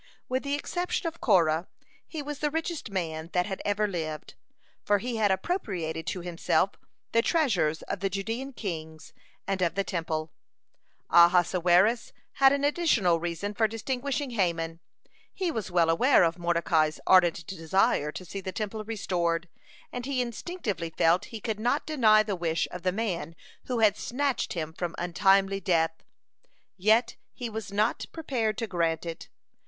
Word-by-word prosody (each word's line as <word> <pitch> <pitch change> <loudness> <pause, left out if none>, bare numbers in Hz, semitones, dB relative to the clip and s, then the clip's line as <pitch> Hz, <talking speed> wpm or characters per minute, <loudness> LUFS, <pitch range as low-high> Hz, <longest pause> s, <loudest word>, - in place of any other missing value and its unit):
With 260 +1 -1
the 280 0 -1
exception 350 +5 -2
of 330 0 -4
Korah 170 -5 +3 0.4
he 310 -3 -5
was 290 0 -6
the 300 - +1
richest 325 -2 -3
man 165 -4 -3
that 180 0 +2
had 190 -2 -5
ever 205 +1 +1
lived, 160 -5 -5 0.5
for 205 - +3
he 235 +3 -3
had 210 -2 +3
appropriated 185 - -2
to 165 +4 -2
himself 175 -1 +1 0.4
the 230 - +4
treasures 205 - +1
of - - -4
the 195 - 0
Judean 225 +8 -3
kings 160 -8 -6 0.3
and 195 -1 -2
of 170 -2 +1
the 195 - +1
Temple. 160 -4 -3 0.8
(93) 170 +1 +7
Ahasuerus 180 +6 +2 0.2
had 270 -1 +5
an 280 0 0
additional 270 - +2
reason 175 +5 -3
for 220 +1 +2
distinguishing 265 +5 -3
Haman. 165 -6 -1 0.5
He 370 -3 -2
was 220 - -4
well 175 -2 +3
aware 245 +7 +5
of 170 +1 0
Mordecai's 170 -2 +1
ardent 180 -1 +4
desire 165 -4 +1
to 185 - -8
see 195 +3 -6
the 190 - -4
Temple 215 +2 -4
restored, 175 -6 -1 0.4
and 245 +1 -4
he 275 -2 -1
instinctively 235 - -3
felt 165 +2 +2
he 225 - -8
could 215 0 -3
not 245 +6 0
deny 220 -8 +5
the 205 -2 -2
wish 165 -1 -1
of 180 - -6
the 185 - +1
man 180 -6 -3 0.3
who 245 -3 -1
had 210 -2 +5
snatched 275 +3 -1
him 160 -2 -4
from 175 0 -4
untimely 195 +2 +3
death. 165 -3 0 0.7
Yet 220 +5 +3 0.2
he 240 -2 -5
was 215 -2 -5
not 210 +3 0
prepared 235 -9 -2
to 230 - -1
grant 170 -5 -1
it. 165 -1 -7
195 Hz, 160 wpm, -28 LUFS, 170-235 Hz, 0.8 s, 93